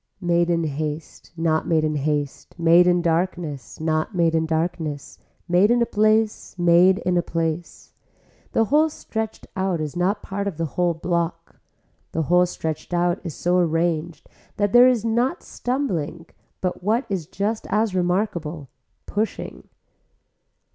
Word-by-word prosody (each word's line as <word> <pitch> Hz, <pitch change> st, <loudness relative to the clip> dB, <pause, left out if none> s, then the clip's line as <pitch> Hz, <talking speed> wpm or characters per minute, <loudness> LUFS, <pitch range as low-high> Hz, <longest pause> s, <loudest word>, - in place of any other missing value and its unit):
Made 175 Hz, -2 st, +1 dB
in 170 Hz, -1 st, +1 dB
haste, 150 Hz, +1 st, -5 dB
not 160 Hz, -1 st, +1 dB
made 160 Hz, -2 st, +2 dB
in 155 Hz, -1 st, 0 dB
haste, 145 Hz, -1 st, -2 dB
made 170 Hz, +1 st, +5 dB
in 175 Hz, -1 st, +3 dB
darkness, 165 Hz, -4 st, -2 dB
not 155 Hz, +4 st, -1 dB
made 170 Hz, -2 st, +2 dB
in 160 Hz, 0 st, +1 dB
darkness, 160 Hz, -3 st, -3 dB, 0.3 s
made 180 Hz, +4 st, +4 dB
in 240 Hz, +1 st, +4 dB
a 235 Hz, -, +3 dB
place, 215 Hz, -2 st, +1 dB
made 175 Hz, +2 st, +5 dB
in 180 Hz, 0 st, +2 dB
a -, -, +4 dB
place. 165 Hz, 0 st, -4 dB, 0.6 s
The 225 Hz, -, +3 dB
whole 305 Hz, +7 st, +3 dB
stretched 220 Hz, -6 st, -5 dB
out 190 Hz, -3 st, 0 dB
is 155 Hz, 0 st, -4 dB
not 190 Hz, +4 st, 0 dB
part 200 Hz, +1 st, -3 dB
of 185 Hz, -6 st, -4 dB
the 165 Hz, -, -1 dB
whole 175 Hz, -1 st, +1 dB
block, 170 Hz, +1 st, -3 dB, 0.5 s
the 160 Hz, -, 0 dB
whole 180 Hz, +3 st, +4 dB
stretched 160 Hz, 0 st, -4 dB
out 175 Hz, 0 st, +1 dB
is 165 Hz, -5 st, -6 dB
so 180 Hz, +1 st, +1 dB
arranged 165 Hz, -1 st, -1 dB, 0.3 s
that 205 Hz, -1 st, 0 dB
there 245 Hz, +1 st, +8 dB
is 240 Hz, -3 st, +2 dB
not 235 Hz, +4 st, 0 dB
stumbling 180 Hz, -, -3 dB, 0.4 s
but 180 Hz, -1 st, -2 dB
what 225 Hz, +7 st, +1 dB
is 190 Hz, -7 st, -3 dB
just 205 Hz, +4 st, -2 dB
as 215 Hz, -1 st, +1 dB
remarkable, 175 Hz, -, -1 dB, 0.4 s
pushing. 215 Hz, +2 st, -4 dB
175 Hz, 150 wpm, -23 LUFS, 160-200 Hz, 0.6 s, there